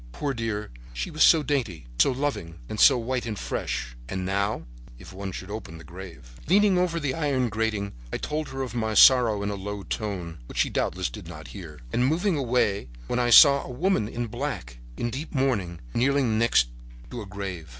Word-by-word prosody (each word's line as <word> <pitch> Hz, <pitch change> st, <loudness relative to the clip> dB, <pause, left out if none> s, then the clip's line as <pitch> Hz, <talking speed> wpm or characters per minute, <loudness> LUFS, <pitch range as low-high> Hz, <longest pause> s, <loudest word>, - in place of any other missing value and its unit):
Poor 140 Hz, -, -2 dB
dear, 110 Hz, -, -3 dB, 0.2 s
she -, -, -4 dB
was -, -, -5 dB
so 160 Hz, -2 st, +7 dB
dainty, 115 Hz, -, -2 dB
so -, -, +5 dB
loving 130 Hz, -11 st, -3 dB
and 110 Hz, -, -5 dB
so -, -, +7 dB
white 120 Hz, +1 st, -2 dB
and 110 Hz, -2 st, -4 dB
fresh—and 60 Hz, +9 st, -4 dB
now—if 90 Hz, -, -4 dB
one 95 Hz, 0 st, -5 dB
should 95 Hz, +2 st, -7 dB
open 105 Hz, -7 st, -7 dB
the 80 Hz, -, -12 dB
grave— 80 Hz, -11 st, -11 dB
"Leaning 200 Hz, +3 st, +4 dB
over 180 Hz, -2 st, +1 dB
the 140 Hz, -4 st, -1 dB
iron 135 Hz, -5 st, 0 dB
grating, 105 Hz, -2 st, -2 dB, 0.2 s
I -, -, -1 dB
told 155 Hz, +1 st, -3 dB
her 135 Hz, 0 st, -4 dB
of 125 Hz, -, -6 dB
my 110 Hz, -2 st, -1 dB
sorrow 115 Hz, -3 st, +6 dB
in 100 Hz, -, -1 dB
a -, -, -3 dB
low 100 Hz, +1 st, -5 dB
tone, 90 Hz, -8 st, -4 dB
which -, -, -10 dB
she -, -, +2 dB
doubtless -, -, -1 dB
did -, -, -9 dB
not -, -, -9 dB
hear, 80 Hz, -7 st, -10 dB
and 120 Hz, -, +1 dB
was 125 Hz, -, +3 dB
moving 175 Hz, +4 st, +1 dB
away 120 Hz, -, 0 dB, 0.2 s
when 120 Hz, -, -1 dB
I 120 Hz, -1 st, +2 dB
saw 140 Hz, +2 st, +8 dB
a -, -, -9 dB
woman 135 Hz, -, 0 dB
in 120 Hz, +2 st, -3 dB
black, 115 Hz, -, -5 dB, 0.2 s
in 120 Hz, -, -2 dB
deep 145 Hz, +6 st, -6 dB
mourning, 105 Hz, -11 st, 0 dB
kneeling 140 Hz, +3 st, +2 dB
on 115 Hz, -, 0 dB
the 110 Hz, -, +1 dB
next -, -, +3 dB, 0.4 s
grave. 100 Hz, -7 st, -6 dB
110 Hz, 200 wpm, -26 LUFS, 95-135 Hz, 0.4 s, saw